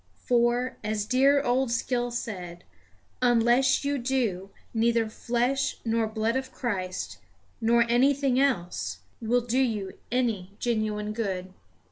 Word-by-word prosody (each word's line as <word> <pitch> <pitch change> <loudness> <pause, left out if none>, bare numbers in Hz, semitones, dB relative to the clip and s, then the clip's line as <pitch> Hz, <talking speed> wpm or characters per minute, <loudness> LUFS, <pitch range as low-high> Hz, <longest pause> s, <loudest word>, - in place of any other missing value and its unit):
For, 245 +1 +2
as 210 -1 -1
dear 275 +4 +4
old 255 0 +1
Skill 245 0 0
said, 180 -7 -6 0.6
unless 245 +3 +3
you 285 0 0
do, 235 -7 -1 0.2
neither 230 0 +2
flesh 245 +5 -1
nor 225 -1 +1
blood 220 +2 -1
of 265 0 -2
Christ, 185 -7 -3 0.4
nor 235 +1 +4
anything 265 +2 +3
else, 175 - -1 0.2
will 240 +2 +2
do 245 +2 0
you 215 -7 0 0.2
any 225 -7 -1
genuine 215 -3 -1
good. 190 -4 -3
235 Hz, 120 wpm, -27 LUFS, 215-255 Hz, 0.6 s, dear